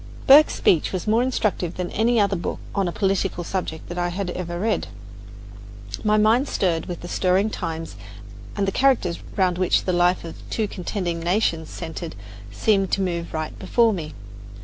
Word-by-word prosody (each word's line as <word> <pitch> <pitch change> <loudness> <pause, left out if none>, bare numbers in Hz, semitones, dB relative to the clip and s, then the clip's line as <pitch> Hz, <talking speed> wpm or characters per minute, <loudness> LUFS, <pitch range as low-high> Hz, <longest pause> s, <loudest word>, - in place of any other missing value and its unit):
Burke's 290 +3 +7
speech 165 - +2
was 185 -2 -3
more 220 +2 +3
instructive 215 -8 -1
than 180 -1 -4
any 230 +2 +2
other 200 -1 +2
book 170 - -3 0.2
on 195 -2 0
a - - -1
political 195 -2 -1
subject 170 -3 -4
that 175 0 -5
I 175 - +1
had 180 0 -3
ever 175 -1 -4
read. 215 +2 0 1.2
My 215 0 +3
mind 225 +6 +3
stirred 170 -4 0
with 175 -2 -6
the 175 - -7
stirring 190 +4 +1
times, 165 - -5 0.6
and 200 - 0
the - - +1
characters 250 -9 +2 0.2
round 185 -2 +1
which 185 - +2
the 185 - -1
life 175 +1 +2
of 165 - -8
two 220 -2 -1
contending 180 -2 -3
nations 165 -2 0
centred 165 0 -6 0.4
seemed 195 - +1
to - - +2
move 170 -2 -2
right 155 -1 -4
before 230 +4 +3
me. 155 -6 -6
185 Hz, 175 wpm, -23 LUFS, 170-210 Hz, 1.2 s, Burke's